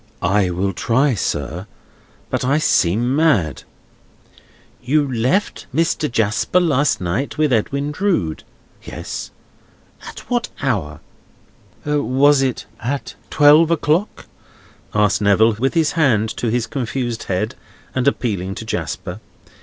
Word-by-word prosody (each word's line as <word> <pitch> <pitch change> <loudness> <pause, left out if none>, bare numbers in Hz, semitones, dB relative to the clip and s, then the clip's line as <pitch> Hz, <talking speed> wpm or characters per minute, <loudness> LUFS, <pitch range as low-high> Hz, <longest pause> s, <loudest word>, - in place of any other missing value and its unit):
"I 95 +1 +2
will 95 +2 -1
try, 130 +9 +1
sir, 85 - -3 0.6
but - - -1
I 135 +3 +2
seem 120 - +2
mad." 115 - +2 1.2
"You 145 +4 +1
left 130 - 0
Mr. 155 -2 +1
Jasper 115 - +1
last 150 -5 +2
night 95 - -2
with 150 -3 +2
Edwin 140 +6 0
Drood?" 150 - -1 0.4
"Yes." - - -6 0.8
"At - - -9
what 240 -1 -2
hour?" 85 - -2 0.8
"Was 145 -1 +3
it 130 -3 -1
at 135 +5 -4 0.2
twelve 150 +2 +6
o'clock?" 170 +4 0 0.7
asked 105 0 +2
Neville, 105 +2 +4
with 135 +5 0
his 160 -2 +2
hand 120 -10 +2
to 120 - -2
his 120 0 0
confused 120 -3 -3
head, 105 +6 -1 0.4
and 130 +1 0
appealing 100 -8 -1
to 110 - -7
Jasper. 90 0 -4
125 Hz, 120 wpm, -19 LUFS, 100-145 Hz, 1.2 s, twelve